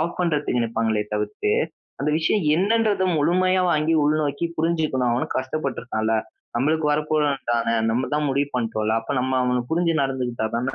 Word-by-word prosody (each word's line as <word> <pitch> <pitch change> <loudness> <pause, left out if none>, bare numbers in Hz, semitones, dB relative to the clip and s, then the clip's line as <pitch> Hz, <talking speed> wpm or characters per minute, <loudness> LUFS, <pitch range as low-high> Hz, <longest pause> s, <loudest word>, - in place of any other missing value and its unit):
of 170 +2 -2
பண்றதுக்கு 150 -7 0
நிப்பாங்களே 115 -2 0
தவிர்த்து 105 0 -2 0.5
அந்த 145 +2 +1
விஷயம் 165 +6 +1
என்னன்றத 210 +2 +2
முழுமையா 185 +5 +2
வாங்கி 155 +1 +1
உள்நோக்கி 150 +1 0
புரிஞ்சுக்கணும், 155 -6 0
அவனும் 120 +2 -1
கஷ்டப்பட்ருக்கான்ல, 130 -5 -2 0.4
நம்மளுக்கு 150 +5 +1
வரப்போறவன்தானே, 145 -6 0 0.2
நம்மதான் 140 +6 0
முடிவு 140 +1 0
பண்ட்டோம்ல, 110 -3 -1
அப்ப 115 - -4
நம்ம 130 +1 0
அவன 125 0 +1
புரிஞ்சு 170 +1 +2
நடந்துக்ட்டாதான 125 -2 -2
140 Hz, 130 wpm, -23 LUFS, 120-155 Hz, 0.5 s, என்னன்றத